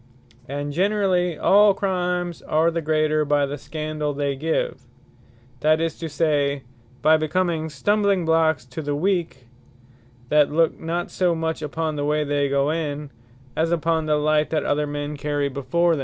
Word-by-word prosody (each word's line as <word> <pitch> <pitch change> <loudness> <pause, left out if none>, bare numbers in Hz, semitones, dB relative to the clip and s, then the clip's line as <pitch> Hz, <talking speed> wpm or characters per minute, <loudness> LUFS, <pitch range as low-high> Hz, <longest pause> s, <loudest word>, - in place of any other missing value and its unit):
And 145 +1 -4
generally 185 -2 +1
all 205 0 +5
Crimes 180 -3 -2
are 160 +2 +2
the 165 0 -2
greater, 155 0 +1
by 145 -1 +2
the 140 +1 -4
scandall 155 -1 -4
they 140 -1 -1
give; 160 +4 -2 0.8
that 155 +3 +3
is 165 -1 -1
to 165 - -4
say, 145 -2 0 0.4
by 155 +1 +6
becoming 160 0 -1
stumbling 200 +5 +1
blocks 160 -5 +2
to 125 +5 -7
the 145 -1 -2
weak, 165 -6 -1 0.8
that 150 -1 +4
look 165 +1 +2
not 170 +2 -3
so 180 -2 +1
much 160 -1 -2
upon 155 +1 -3
the 145 - -1
way 150 +1 +1
they 145 -1 0
go 140 +1 +1
in, 150 -3 -3 0.4
as 165 +1 +1
upon 165 -1 0
the 150 - +3
light 150 0 +2
that 160 - -1
other 150 +1 0
men 145 0 -4
carry 145 -1 -1
before 165 +6 +1
them. - - -4
155 Hz, 165 wpm, -23 LUFS, 145-165 Hz, 0.8 s, by